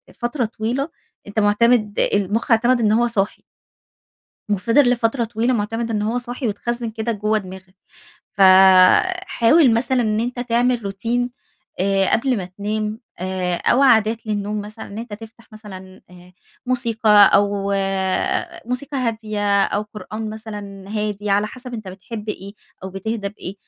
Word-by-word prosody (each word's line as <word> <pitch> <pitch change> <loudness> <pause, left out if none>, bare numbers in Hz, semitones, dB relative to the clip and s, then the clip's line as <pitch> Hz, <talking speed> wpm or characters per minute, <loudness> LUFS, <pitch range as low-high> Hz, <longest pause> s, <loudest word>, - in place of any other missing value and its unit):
فترة 240 +1 -2
طويلة، 235 +6 -3 0.4
أنت 205 +2 -2
مُعتمِد 215 0 +2
المُخ 205 +4 0
اعتمَد 240 +2 +4
إن 210 -1 +3
هو 240 +2 +3
صاحي. 210 -3 -2 1.1
وفضل 230 +7 +3
لفترة 240 0 +1
طويلة 230 +2 -1
مُعتمد 225 +1 -2
إن 210 - -1
هو 225 +4 -1
صاحي 245 +1 -4
واتخزِّن 235 +3 -3
كده 225 +1 -3
جوّه 215 0 0
دماغك. 185 -1 -9 0.6
ف - - -10 0.9
حاول 250 -3 +4
مثلًا 255 +2 +1
إن 215 -2 0
أنت 245 +1 -3
تعمل 245 -1 +1
روتين 235 +5 -2 0.5
آآ 195 0 +1
قبل 255 +1 +2
ما 190 - -3
تنام 210 +4 -4 0.2
آآ 185 -1 -2
أو 260 - +2
عادات 225 -3 +3
للنوم 210 0 -2
مثلًا 215 +2 -9
إن 205 +2 -9
أنت 230 -2 -8
تفتح 225 +2 -12
مثلًا 190 -3 -12
آآ 180 0 -16 0.3
موسيقى، 230 -4 0 0.2
أو 200 0 +2 1.0
موسيقى 280 +3 -4
هادية 215 -5 0
أو 205 - -1
قرآن 215 +1 -7
مثلًا 205 -3 -8
هادي 210 -1 -3
على 205 +1 +2
حسب 250 +2 -9
أنت 215 -4 -7
بتحب 210 +3 -8
إيه 200 -1 -6 0.3
أو 190 - -6
بتهدى 200 +2 -4
بإيه. 195 -2 -9
215 Hz, 145 wpm, -20 LUFS, 205-235 Hz, 1.1 s, اعتمَد